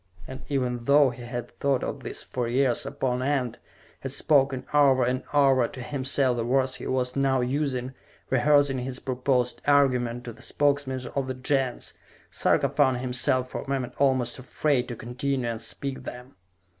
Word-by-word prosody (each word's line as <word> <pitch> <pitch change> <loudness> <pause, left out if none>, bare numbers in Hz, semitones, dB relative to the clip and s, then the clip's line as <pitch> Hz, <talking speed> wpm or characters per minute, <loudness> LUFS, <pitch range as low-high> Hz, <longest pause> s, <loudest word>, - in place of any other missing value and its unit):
And, 130 +1 -8
even 125 -4 -1
though 140 -1 +5
he 120 0 -11
had 120 0 -7
thought 140 -2 +1
of - - -4
this - - -6
for 125 -2 -3
years 130 +1 +1
upon 130 -3 -2
end, 130 -3 -1 0.4
had 135 - -5
spoken 135 -2 +2
over 135 -3 +5
and 130 +1 0
over 135 -4 +4
to 130 - -11
himself 130 0 0
the 115 - -1
words 130 +2 +1
he - - -7
was 125 -1 -1
now 135 -2 +2
using, 130 -1 -1 0.4
rehearsing 140 +1 +3
his 125 0 -4
proposed 125 -1 -1
argument 125 -4 +2
to 120 -2 -7
the 110 - -16
Spokesmen 140 -2 0
of 135 -2 -1
the 130 - -3
Gens, 130 -1 -1 0.4
Sarka - - +2
found 130 -4 +2
himself 125 0 0
for - - -4
a - - -10
moment 135 -2 -2
almost 130 -3 +1
afraid 130 0 0
to 120 - -5
continue 125 +3 -2
and 115 -1 -3
speak 135 -1 -5
them. 125 0 -9
130 Hz, 170 wpm, -26 LUFS, 125-140 Hz, 0.4 s, though